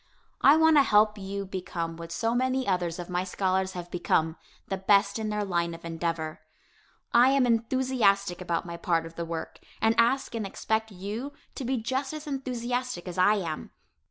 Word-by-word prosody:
I 280 - +8
want 320 -1 +5
to - - +9
help 210 -3 +4
you 200 +1 -4
become 175 -3 -4
what 165 0 -9
so 225 +7 0
many 260 +1 0
others 175 -2 0
of 175 -1 -6
my 180 0 -1
scholars 190 0 0
have 175 -1 -7
become, 160 -2 +1 0.3
the 195 - -2
best 200 +2 +3
in 215 -1 -2
their 210 0 -1
line 170 -3 -1
of 170 - -12
endeavor. 165 -1 -3 0.7
I 245 +2 +7
am 270 -1 +4
enthusiastic 230 -6 +1
about 170 -1 -1
my 170 -1 -6
part 165 -1 0
of 165 - -9
the 170 0 -4
work, 165 -1 -5 0.2
and 225 0 +3
ask 245 +3 +2
and 225 -2 -2
expect 220 +3 -1
you 210 +8 -5 0.2
to 270 - -5
be 260 +2 0
just 265 +5 -2
as 305 0 -7
enthusiastic 250 -7 -3
as 180 0 -5
I 205 +3 +5
am. 165 -6 -4
200 Hz, 185 wpm, -28 LUFS, 175-245 Hz, 0.7 s, to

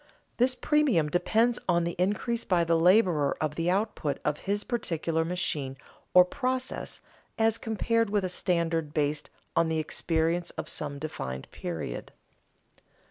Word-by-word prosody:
This 255 +1 +3
premium 265 - +2
depends 225 +8 +2
on 170 -1 +3
the 170 - -1
increase 210 +5 0
by 175 -3 +2
the 165 0 +2
laborer 170 -4 +4
of 155 -1 -1
the 165 +3 -1
output 190 -7 0
of 150 - 0
his 205 +1 +1
particular 165 -8 -1
machine 150 -6 -2 0.4
or 180 0 +9
process 255 +6 -3 0.4
as 225 0 +3
compared 230 0 0
with 205 -1 +1
a - - +1
standard 170 -4 -1
based 150 0 0 0.3
on 165 - +3
the 160 0 0
experience 165 +2 0
of - - -4
some 145 -2 -2
definite 65 - -5
period. 85 -3 -5
170 Hz, 140 wpm, -28 LUFS, 155-215 Hz, 0.4 s, or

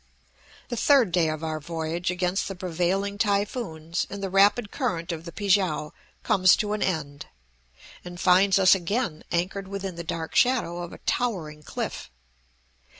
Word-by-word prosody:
The 240 - -2
third 260 -6 +4
day 170 -2 +2
of 155 0 -4
our 155 -1 -2
voyage 165 +2 -3
against 180 +1 -1
the 195 - -5
prevailing 185 +3 -1
typhoons 200 -6 -1
and 200 0 -6
the 195 - -3
rapid 205 +3 +4
current 180 - -2
of 165 0 -6
the 170 - -7
Pi 205 - -6
kiang, 180 -6 +2 0.3
comes 185 -2 +5
to 210 -1 -2
an 210 - -3
end, 145 -5 -2 0.8
and 175 0 -9
finds 190 +2 +4
us 190 -1 +6
again 190 -2 -1
anchored 190 +3 -1
within 195 -2 -5
the 170 - -5
dark 165 0 -4
shadow 235 -9 +2
of 175 - -7
a - - -10
towering 170 -11 -2
cliff. - - -5
180 Hz, 160 wpm, -26 LUFS, 165-200 Hz, 0.8 s, us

